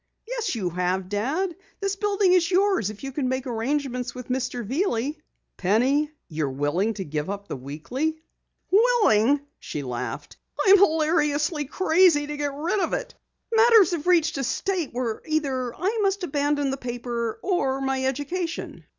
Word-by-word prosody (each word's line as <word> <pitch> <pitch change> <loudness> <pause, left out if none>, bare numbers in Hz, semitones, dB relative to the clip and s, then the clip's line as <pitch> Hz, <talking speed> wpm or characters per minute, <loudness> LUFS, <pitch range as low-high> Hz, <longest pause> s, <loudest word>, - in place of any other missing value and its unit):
"Yes, 470 - -2
you 185 -6 -2
have, 180 +1 -1
Dad. 295 - -1 0.2
This 395 0 -1
building 400 -2 +2
is 350 -2 +3
yours 380 - +2
if 215 +3 -10
you 270 - -4
can 265 -1 -1
make 260 +1 -2
arrangements 250 +1 -2
with 250 0 -8
Mr. 250 -2 -2
Veeley." 280 - -1 0.4
"Penny! 255 +10 +2 0.2
You're 155 -3 -2
willing 145 +11 0
to 190 - -4
give 150 +2 -3
up 200 0 -5
the - - -4
Weekly?" 240 - -3 0.5
"Willing?" 370 - +4 0.2
she 145 - -5
laughed. 125 -1 -5 0.2
"I'm 395 0 +7
hilariously 305 -3 +2
crazy 330 -1 +3
to 295 0 -5
get 290 -1 -2
rid 330 +8 -1
of - - -1
it. - - -3 0.4
Matters 450 -5 +6
have 335 -2 -3
reached 325 -5 +3
a - - -1
state 350 +4 -1
where 235 -2 -3
either 270 -6 -1
I 410 +6 -1
must 395 -1 +1
abandon 290 -2 0
the 270 - -3
paper 240 -2 -4
or 310 -8 0
my 270 -1 -1
education. 295 +6 -3
285 Hz, 160 wpm, -25 LUFS, 235-355 Hz, 0.5 s, I'm